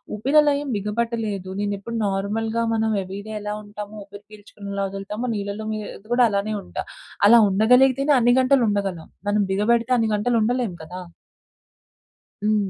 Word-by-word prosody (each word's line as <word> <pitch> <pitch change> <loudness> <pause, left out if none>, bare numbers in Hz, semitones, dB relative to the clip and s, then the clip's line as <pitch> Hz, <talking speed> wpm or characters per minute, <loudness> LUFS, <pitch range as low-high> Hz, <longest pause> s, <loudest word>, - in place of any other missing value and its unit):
ఊపిరిలో 290 +7 +3
ఏం 290 - -5
బిగబట్టలేదు, 210 -2 -3
నేనెప్పుడు 205 +2 -3
నార్మల్‍గా 220 +4 -1
మనం 220 0 +1
ఎవ్రీడే 200 +3 -7
ఎలా 210 0 -4
ఉంటామో, 210 0 -9
ఊపిరి 205 0 -13
పీల్చుకునేలా 200 -1 -6
వదులుతాము, 200 +5 -5
నీళ్లలో 200 +1 -4 0.5
కూడా 245 0 +5
అలానే 205 +1 -1
ఉంటా. - - -5 0.4
అలా 235 +2 +8
ఉండగలిగితేనే 255 +7 +4
అన్ని 240 0 +4
గంటలు 260 +1 +3
ఉండగలం. 195 -5 -2 0.2
మనం 205 0 +2
బిగబెడితే 230 +5 +2
అన్ని 225 -2 +1
గంటలు 235 +4 0
ఉండలేము 240 -5 -1
కదా! 180 +3 -8 1.4
హ్మ్. 210 -2 +1
210 Hz, 130 wpm, -23 LUFS, 200-235 Hz, 1.4 s, అలా